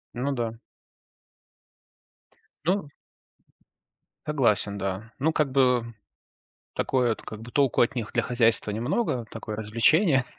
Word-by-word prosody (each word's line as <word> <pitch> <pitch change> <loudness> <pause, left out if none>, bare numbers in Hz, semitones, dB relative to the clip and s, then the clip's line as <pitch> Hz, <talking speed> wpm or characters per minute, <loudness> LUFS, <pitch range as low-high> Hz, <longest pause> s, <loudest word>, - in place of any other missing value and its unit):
Ну 135 +4 -1
да. 115 -3 -2 2.1
Ну. 185 -3 +1 1.4
Согласен, 115 -8 +1
да. 100 +4 -4
Ну, 160 +4 +2
как 150 -4 0
бы, 125 -3 +3 0.9
такое 125 -3 +1
это - - -5
как 110 0 -8
бы 120 - -10
толку 140 -3 +3
от 120 - +3
них 115 -4 -3
для - - +1
хозяйства 115 -3 +2
немного, 120 - -1
такое 110 -1 -6
развлечение. 125 - +3
120 Hz, 115 wpm, -26 LUFS, 110-135 Hz, 2.1 s, бы